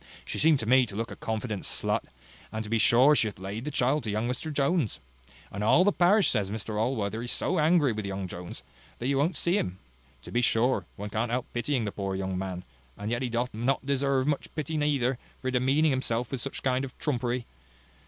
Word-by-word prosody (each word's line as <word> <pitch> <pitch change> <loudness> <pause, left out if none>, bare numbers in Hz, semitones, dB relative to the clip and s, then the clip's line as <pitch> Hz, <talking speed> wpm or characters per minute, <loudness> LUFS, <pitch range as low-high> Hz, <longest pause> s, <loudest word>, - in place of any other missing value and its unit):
She - - -4
seemed 155 -1 +5
to - - -3
me 130 +2 +5
to 100 - -9
look 115 +2 -3
like - - -8
a - - -14
confident 110 -2 -2
slut: - - -1 0.5
and 110 0 -3
to 105 - -8
be 115 - +3
sure 125 +6 +6
she 125 -6 +3
hath 105 - -6
laid 100 +6 -5
the - - -1
child 135 +1 +1
to 110 - -4
young 110 +3 0
Mr 125 +6 -3
Jones. 140 - +1 0.5
And 100 +1 -4
all 170 +11 +5
the 205 - +4
parish 195 +3 +4
says 105 -5 0
Mr 105 0 -3
Allworthy 110 -3 -1
is 120 - -2
so 185 - 0
angry 155 -3 +4
with 105 -2 -4
young 95 0 -3
Mr - - -11
Jones, 85 -7 -7 0.3
that 120 - -6
he 140 - +2
won't 145 +6 +1
see 175 +4 +2
him. 90 0 -3 0.5
To - - -10
be 120 - +2
sure, 120 +2 +2
one 105 +1 -6
can't 115 +3 -1
help 125 +1 -1
pitying 125 +1 0
the 105 - -2
poor 95 -1 -3
young 95 -1 -2
man, 90 -1 -4 0.3
and 105 +2 -4
yet 120 - 0
he 130 - -1
doth 120 +2 -1
not 125 +5 0
deserve 140 -1 +1
much 145 -1 -1
pity 155 0 -3
neither, 140 -4 +1 0.2
for 130 - -2
demeaning 135 +5 +3
himself 125 -3 -1
with 135 -3 -3
such 135 - -5
kind 130 0 +1
of 130 -2 -7
trumpery. 125 -4 -1
125 Hz, 230 wpm, -28 LUFS, 110-140 Hz, 0.5 s, sure